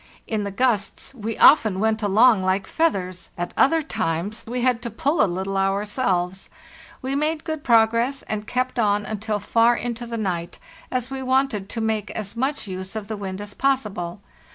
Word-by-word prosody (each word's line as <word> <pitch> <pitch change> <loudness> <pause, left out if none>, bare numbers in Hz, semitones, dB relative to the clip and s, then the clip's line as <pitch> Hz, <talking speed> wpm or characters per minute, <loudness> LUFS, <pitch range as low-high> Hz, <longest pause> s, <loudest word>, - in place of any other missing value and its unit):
In 215 -2 -2
the - - -2
gusts 215 +1 -1
we 225 -3 -4
often 215 -10 +6
went 220 +1 +1
along 215 +1 +5
like 190 +1 +1
feathers, 185 - -1
at 175 0 -4
other 315 +4 +4
times 195 - -2
we 245 +2 -2
had 250 -2 +2
to 235 - -4
pull 285 +8 0
a 205 - +2
little 190 +2 -2
ourselves. 195 -2 0 0.5
We 265 +1 -2
made 305 +2 0
good 315 -2 -4
prog 225 -2 +5
ress, 250 +4 0
and 210 -1 -4
kept 255 0 -1
on 205 -2 +2
until 215 0 -2
far 230 +4 +3
into 240 0 -4
the 230 0 -4
night, 175 -5 -3 0.3
as 255 0 -2
we 270 0 -4
wanted 260 -6 0
to 230 - -4
make 220 -2 -1
as 210 0 -5
much 265 0 -1
use 190 +1 -6
of 215 -1 -5
the 220 - -2
wind 195 -1 -5
as 205 0 -8
possible. 210 -10 -1
220 Hz, 185 wpm, -23 LUFS, 195-255 Hz, 0.5 s, often